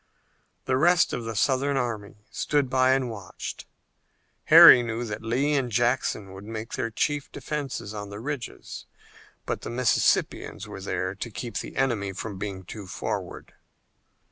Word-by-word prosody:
The 130 - +1
rest 175 +5 +4
of 120 - -3
the 115 0 -4
Southern 135 +5 +1
army 105 -4 -4
stood 145 -4 0
by 130 0 +4
and 135 -1 +1
watched. 105 -5 -7 0.8
Harry 125 - +10
knew 115 0 -3
that 105 -2 -5
Lee 130 +6 0
and 130 -4 0
Jackson 120 -4 0
would 95 +1 -10
make 110 +1 -7
their 120 -3 -2
chief 145 +5 -1
defense 145 -3 -4
on 105 -1 -6
the 100 0 -7
ridges, 140 0 -6 0.6
but - - -3
the - - -6
Mississippians 125 +1 +1
were 95 - -8
there 95 -1 -2
to 100 +4 -6
keep 115 -1 -6
the - - -6
enemy 110 -7 0
from 100 0 -6
being 100 -2 -5
too 100 +2 -9
forward. 90 - -5
115 Hz, 155 wpm, -26 LUFS, 105-130 Hz, 0.8 s, Harry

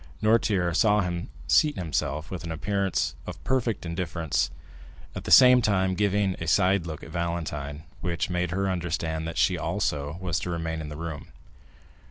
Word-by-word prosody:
Noirtier 100 -6 +2
saw 105 +1 +4
him 85 -2 -3 0.2
seat 150 -1 +4
himself 75 -2 -2
with 95 - -5
an 85 - -5
appearance 100 +3 -1
of - - -8
perfect 120 -7 0
indifference, 85 -2 -1 0.6
at - - -7
the - - -4
same 125 -1 +8
time 95 -4 +2
giving 100 0 +1
a 85 - -3
side 95 +1 +3
look 80 -2 -6
at 80 - -10
Valentine, 80 -4 -3 0.2
which 85 -2 -2
made 90 -1 -1
her 95 +3 -1
understand 85 -3 -2
that 80 - -5
she - - +2
also 70 +2 -2
was 90 -3 -1
to - - -4
remain 80 -1 -3
in 75 - -6
the 75 - -7
room. 80 -3 -6
85 Hz, 170 wpm, -26 LUFS, 80-95 Hz, 0.6 s, same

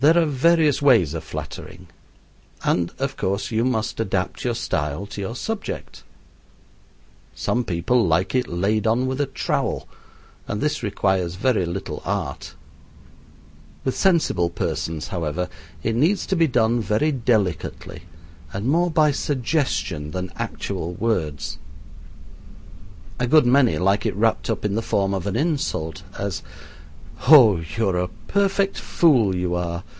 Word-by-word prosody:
There 160 +4 +6
are 170 - +4
various 155 +1 +3
ways 115 - +4
of 80 -1 -4
flattering, 75 +3 -8 0.8
and, 85 -1 +1
of 135 +1 -2
course, 100 +4 -2
you 110 +1 +1
must 120 -4 -1
adapt 95 -4 -2
your 120 -2 0
style 75 -6 -2
to 100 0 -7
your 115 +4 -4
subject. 220 - -5 1.3
Some 125 - 0
people 95 +4 +1
like 85 +4 +1
it 125 -1 +1
laid 100 +5 0
on 120 +4 +2
with 130 +2 -1
a 145 - 0
trowel, - - -2 0.6
and 100 - -3
this 150 0 -1
requires 95 -4 0
very 100 -3 +1
little 85 -3 -5
art. 95 -8 -4 1.3
With 130 - 0
sensible 160 - +2
persons, 80 -2 -3
however, 85 0 -2 0.4
it 110 0 0
needs 165 - +2
to 190 - 0
be 165 -2 +4
done 120 -2 +2
very 110 +9 +1
delicately, 110 - -1 0.5
and 100 +3 -4
more 170 +6 +2
by 155 -2 +3
suggestion 130 - -1
than 90 +3 -5
actual 85 +2 -4
words. 85 -11 -2 1.6
A 125 - +1
good 155 +1 +5
many 125 - +4
like 100 +4 +2
it - - -2
wrapped 110 +2 +1
up - - -2
in 100 - 0
the 110 - 0
form 100 -3 0
of 95 -1 -2
an 100 - -2
insult, 135 - -1 0.2
as 100 -2 -3 0.9
"Oh, 120 - +8 0.2
you 110 -2 +2
are 90 - 0
a 90 - 0 0.2
perfect 200 0 +1
fool, 120 - +3
you 90 -1 -1
are. 85 0 -2
110 Hz, 145 wpm, -23 LUFS, 90-135 Hz, 1.6 s, Oh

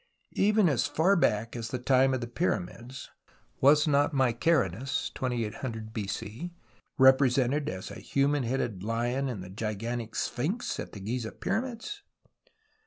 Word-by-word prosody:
Even 210 -1 +4
as 145 -2 +2
far 160 +7 +3
back 115 - +1
as 115 -1 -4
the 125 - -3
time 130 +1 +3
of 130 - -3
the 120 - -3
Pyramids 120 - -3 0.5
was 150 +3 +5
not 145 0 +2
Mykerinus 130 - +1
(2800 115 -2 -3
n.c.) 110 - -4 0.5
represented 130 +1 +4
as 95 +1 -6
a - - -8
human 140 +1 +1
headed 120 -5 -2
lion 120 +5 -1
in 110 -7 -4
the 90 - -9
gigantic 115 +2 -4
Sphinx 175 - -2
at - - -6
the 105 - -7
Giza 110 +2 -3
Pyramids 245 - -3
125 Hz, 135 wpm, -29 LUFS, 115-145 Hz, 0.5 s, was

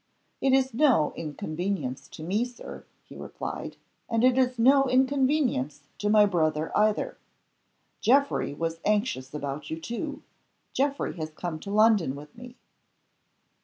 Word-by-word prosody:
"It 270 - +3
is 265 -1 +3
no 245 - +3
inconvenience 155 -2 -4
to 155 - -10
me, 200 +8 0
Sir," 245 0 -9 0.2
he - - -14
replied, - - -6 0.3
"and 230 0 +1
it 255 0 +5
is 255 -1 +2
no 270 +4 +5
inconvenience 260 - +1 0.2
to 210 - 0
my 210 0 +6
brother 160 -5 0
either. 215 - +1 0.8
Geoffrey 275 +5 +2
was 165 +1 -3
anxious 205 - 0
about 145 0 -5
you 160 - -4
too. 240 - -5 0.5
Geoffrey 280 +1 -1
has 155 -1 -4
come 155 0 -5
to 200 - -9
London 210 -9 +3
with 150 +1 -12
me." 245 +1 -11
210 Hz, 135 wpm, -27 LUFS, 155-255 Hz, 0.8 s, my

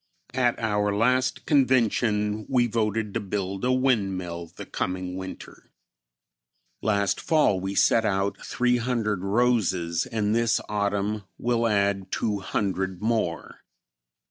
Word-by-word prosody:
At 125 -2 +2
our 105 -2 0
last 125 +4 +1
convention 110 -6 +2
we 125 -2 +3
voted 110 -2 -1
to 115 - 0
build 100 -1 -4
a 125 - +2
windmill 95 -10 0
the - - -10
coming 90 0 -3
winter. 95 0 -9 1.1
Last 100 -3 +1
fall 150 - +3
we 95 +1 -4
set 115 - +4
out 100 -1 -1
300 120 -5 0
roses 100 -6 +1
and 105 -2 0
this 115 0 +2
autumn 100 0 -1
will 120 -1 +1
add 100 -2 0
200 95 -2 -2
more. 110 -8 -1
105 Hz, 115 wpm, -26 LUFS, 95-115 Hz, 1.1 s, set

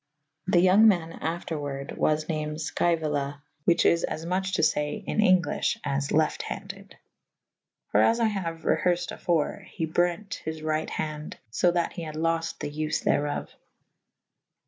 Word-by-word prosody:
The 175 -2 +4
yonge 190 +5 +6
man 170 -6 +3
after 165 -1 -3
warde 140 -1 -5
was 155 0 +1
named 155 -1 -2
Sceuola 150 -2 -1
/ 150 - -45
whiche 170 - +4
is 170 - +4
as 160 - -3
muche 190 +2 -1
to 160 - +1
fay 150 -1 +1
in - - -2
Englyffh 185 -6 +3
as 140 -1 -1
lefte 155 +1 +1
handed. - - -8 0.9
For 105 - +4
as 230 - +4
I 230 - +3
haue 180 -5 -3
reherfed 175 +2 +1
afore 165 -4 0
/ - - -20
he 165 - -1
brente 175 +6 -1
his 160 0 -5
ryght 155 0 -1
hande 150 -1 -4
/ - - -41
so 175 - +3
that 175 -1 0
he 175 - -6
had 155 -2 -6
lofte 165 +1 -1
the 145 - -3
vfe 155 +1 -2
therof. 145 0 0
160 Hz, 170 wpm, -27 LUFS, 150-175 Hz, 0.9 s, yonge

